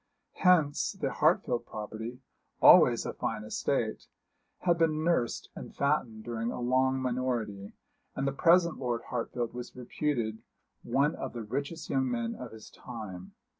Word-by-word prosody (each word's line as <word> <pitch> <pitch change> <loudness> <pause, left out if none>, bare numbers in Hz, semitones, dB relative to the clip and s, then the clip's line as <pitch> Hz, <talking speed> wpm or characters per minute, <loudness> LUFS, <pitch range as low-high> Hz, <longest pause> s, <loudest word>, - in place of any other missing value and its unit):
Hence 165 -5 +3
the 150 -9 -2
Hartfield 150 -6 +1
property, 110 +4 -6 0.4
always - - +7
a - - -3
fine 105 -1 -3
estate, 110 - -2 0.5
had 175 -1 +2
been 155 -1 +2
nursed 160 -9 0
and - - -9
fattened 135 -7 0
during 115 0 -3
a - - -5
long 130 +2 +2
minority, 120 -6 -2 0.4
and 135 - -1
the - - +1
present 170 +4 +4
Lord 120 -3 -2
Hartfield 120 -1 -2
was 125 0 -7
reputed 120 -3 -2 0.4
one 145 +3 +1
of 130 -6 -6
the 120 -2 -5
richest 140 +9 -4
young 130 -1 +1
men 115 -1 -2
of 125 -2 -8
his 110 -1 -12
time. 105 -7 -8
125 Hz, 145 wpm, -30 LUFS, 115-145 Hz, 0.5 s, always